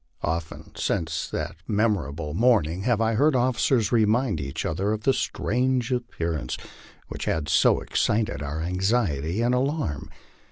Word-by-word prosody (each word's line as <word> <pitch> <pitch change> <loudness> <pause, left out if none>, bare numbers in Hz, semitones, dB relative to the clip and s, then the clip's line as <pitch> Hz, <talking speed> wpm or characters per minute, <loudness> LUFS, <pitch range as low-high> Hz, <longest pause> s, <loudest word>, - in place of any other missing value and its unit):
Often 80 0 -3
since 80 -5 -1
that - - -4
memorable 85 -9 0
morning 95 -5 +2
have 120 -3 +2
I 115 0 +2
heard 140 +6 +3
officers 125 -2 +2
.remind 115 - +2
each 70 0 -4
other 95 +6 0
of 110 0 -4
the 135 - +4
strange 125 0 0
appearance 85 - -2 0.5
which - - -5
had 80 -2 -1
so - - +4
excited 105 -8 0
our 75 +2 -3
anxiety 90 - 0
and 120 +1 +2
alarm. 130 - -1
105 Hz, 135 wpm, -25 LUFS, 80-120 Hz, 0.5 s, the